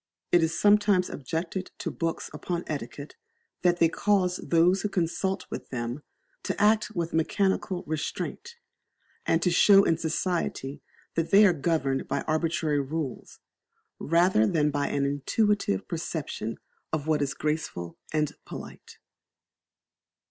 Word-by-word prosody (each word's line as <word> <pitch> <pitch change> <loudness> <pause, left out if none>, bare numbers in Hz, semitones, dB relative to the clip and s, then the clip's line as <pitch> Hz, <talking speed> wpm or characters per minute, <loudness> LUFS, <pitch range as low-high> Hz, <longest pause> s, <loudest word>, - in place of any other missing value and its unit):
It 175 - +5
is 160 0 0
sometimes 205 -3 +4
objected 165 +6 -4
to - - -4
books 165 -1 -3
upon 175 -1 -3
etiquette 145 0 -6 0.5
that 175 -1 +3
they 170 - +5
cause 185 0 +1
those 175 +3 +3
who 210 - -1
consult 190 +1 -1 0.2
them 120 +2 -4 0.4
to - - -3
act 215 +1 +3
with 170 -1 -2
mechanical 185 +2 0
restraint, 155 - -4 0.7
and 165 +1 +2
to 180 - +3
show 195 +3 +7
in 165 -3 +1
society 160 -4 -2 0.3
that 165 0 -1
they 205 +2 +7
are 185 - +5
governed 140 -4 0
by - - -1
arbitrary 155 -1 0
rules, 140 -1 -5 0.6
rather 170 - +3
than 150 +1 +2
by 145 0 0
an 140 -1 0
intuitive 145 - 0
perception 155 -8 -4 0.3
of 155 -2 -2
what 155 -2 +1
is 140 -2 -1
graceful 150 - -3 0.2
and 150 -1 0
polite. - - -10
165 Hz, 130 wpm, -27 LUFS, 145-185 Hz, 0.7 s, show